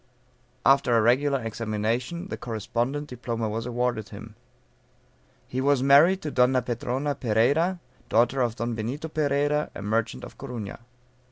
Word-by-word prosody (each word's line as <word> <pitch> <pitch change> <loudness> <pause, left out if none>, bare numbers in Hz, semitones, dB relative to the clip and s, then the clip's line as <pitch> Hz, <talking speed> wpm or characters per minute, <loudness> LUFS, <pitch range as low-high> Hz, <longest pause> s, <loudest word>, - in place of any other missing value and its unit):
After 135 -3 +5
a - - +4
regular 135 +4 +3
examination 115 - -2
the - - -3
correspondent 120 +5 -3
diploma 115 -3 -3
was 115 +2 -3
awarded 120 -4 -1
him. - - -10 1.1
He 130 - -3
was 140 -1 +2
married 155 +8 +6
to 150 - -3
Donna 125 0 +3
Petrona 125 +4 -2
Pereyra, 140 - +2 0.3
daughter 120 +3 +3
of 120 -2 0
Don 120 +1 -2
Benito 125 +8 -4
Pereyra, 145 0 0
a - - -6
merchant 110 +2 -1
of - - -11
Corunna. 120 -7 -6
125 Hz, 140 wpm, -26 LUFS, 115-140 Hz, 1.1 s, married